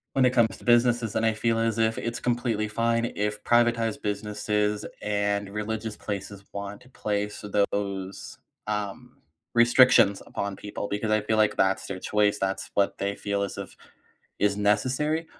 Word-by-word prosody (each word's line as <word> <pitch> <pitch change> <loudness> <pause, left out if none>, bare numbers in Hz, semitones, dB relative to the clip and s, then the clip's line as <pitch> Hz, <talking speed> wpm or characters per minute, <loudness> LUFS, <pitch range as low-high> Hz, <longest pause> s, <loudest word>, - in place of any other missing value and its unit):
When 135 - +4
it 125 - +6
comes 120 -3 +3
to - - -16
businesses, 120 -2 +3
then 110 - 0
I 110 - +3
feel 115 +1 0
as 115 -1 0
if 110 0 +2
it's 115 0 -3
completely 120 -3 0
fine 115 +2 0
if 105 0 -2
privatized 115 -2 +2
businesses 105 0 -1 0.2
and 100 -1 0
religious 105 +1 -4
places 100 -1 -5
want 100 0 -6
to 130 - -18
place 105 -4 -3
those, 100 -2 -2 0.3
um, 105 -2 -4 0.4
restrictions 120 -4 +6
upon 100 -1 -4
people 100 +1 -5
because 105 +1 -2
I 110 - +4
feel 110 +1 0
like 110 -1 +2
that's 95 0 +2
their 95 -1 -5
choice. 105 +1 +1
That's 95 0 -2
what 100 -1 +2
they 100 0 -1
feel 100 -1 -2
as 100 - -3
if - - -7 0.6
is 105 -1 +2
necessary. 130 +10 +1
105 Hz, 165 wpm, -26 LUFS, 100-115 Hz, 0.6 s, it